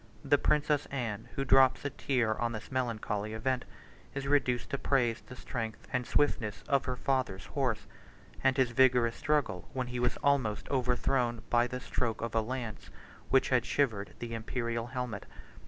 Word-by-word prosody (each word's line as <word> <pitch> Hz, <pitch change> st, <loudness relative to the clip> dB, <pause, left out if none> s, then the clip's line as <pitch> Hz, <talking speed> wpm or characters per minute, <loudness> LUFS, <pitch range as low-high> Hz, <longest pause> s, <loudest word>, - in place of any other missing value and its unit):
The 145 Hz, -, +4 dB
princess 150 Hz, -1 st, +2 dB
Anne, 115 Hz, -6 st, -4 dB
who 135 Hz, -, -1 dB
drops 135 Hz, +1 st, +5 dB
a 145 Hz, -, -1 dB
tear 125 Hz, -5 st, +1 dB
on 120 Hz, 0 st, 0 dB
this 110 Hz, 0 st, -7 dB
melancholy 110 Hz, -4 st, -2 dB
event, 125 Hz, +3 st, -1 dB, 0.5 s
is 135 Hz, 0 st, -3 dB
reduced 135 Hz, -4 st, +1 dB
to 140 Hz, -, -1 dB
praise 120 Hz, -4 st, +1 dB
the 125 Hz, -, -11 dB
strength 115 Hz, -3 st, -5 dB
and 125 Hz, -1 st, 0 dB
swiftness 110 Hz, -7 st, +1 dB
of 140 Hz, -2 st, +2 dB
her 125 Hz, -, -1 dB
father's 125 Hz, -8 st, -1 dB
horse, 130 Hz, -6 st, -1 dB, 0.6 s
and 135 Hz, 0 st, +3 dB
his 130 Hz, -2 st, +3 dB
vigorous 125 Hz, -2 st, +4 dB
struggle 140 Hz, -, 0 dB
when 130 Hz, -1 st, -1 dB
he 125 Hz, 0 st, -4 dB
was 125 Hz, 0 st, +1 dB
almost 130 Hz, -7 st, +2 dB
overthrown 125 Hz, -2 st, +1 dB
by 120 Hz, 0 st, +4 dB
the 125 Hz, 0 st, -4 dB
stroke 115 Hz, -3 st, -2 dB
of 115 Hz, -1 st, -3 dB
a 115 Hz, -, +3 dB
lance, 120 Hz, -1 st, -5 dB, 0.4 s
which 135 Hz, -, +4 dB
had 125 Hz, -2 st, +3 dB
shivered 110 Hz, -9 st, 0 dB
the 120 Hz, -1 st, -6 dB
Imperial 115 Hz, +1 st, -2 dB
helmet. 125 Hz, -4 st, -4 dB
125 Hz, 170 wpm, -31 LUFS, 115-135 Hz, 0.6 s, drops